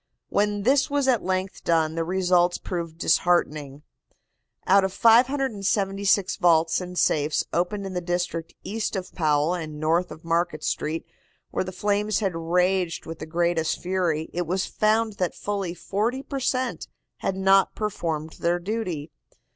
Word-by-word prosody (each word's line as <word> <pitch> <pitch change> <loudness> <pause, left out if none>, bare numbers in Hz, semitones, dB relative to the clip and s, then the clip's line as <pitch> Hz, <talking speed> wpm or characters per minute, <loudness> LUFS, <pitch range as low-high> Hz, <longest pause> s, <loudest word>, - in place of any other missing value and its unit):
When 205 0 0
this 270 +4 +3
was 285 -1 +1
at 245 -5 +3
length 185 +1 -2
done 160 -2 +2
the 165 0 -1
results 180 0 +2
proved 170 -3 -5
disheartening. 150 -5 +1 0.8
Out 195 +1 +5
of 190 - 0
576 205 -5 +2
vaults 165 -2 +3
and 180 0 -7
safes 150 -2 +2
opened 195 +4 -1
in 190 - -5
the 180 - -2
district 175 -1 -3
east 215 +1 -3
of 190 -1 -5
Powell 155 0 +2
and 155 -4 -5
north 165 +3 +1
of 160 - -11
Market 165 -1 0
Street, 160 +2 -2 0.5
where - - 0
the 185 - -6
flames 205 +2 0
had 195 -5 -1
raged 180 +1 0
with 165 0 -7
the - - -6
greatest 170 -1 0
fury, 175 -4 -1
it 175 -1 -2
was 185 +2 0
found 215 0 +1
that 180 -2 -1
fully 195 -4 -3
forty 220 +9 -2
per 275 -1 -4
cent. 255 0 -1 0.3
had 190 - -2
not 195 0 +3
performed 165 -7 -3
their 170 +1 +1
duty. 175 -6 -4
180 Hz, 155 wpm, -25 LUFS, 165-200 Hz, 0.8 s, Out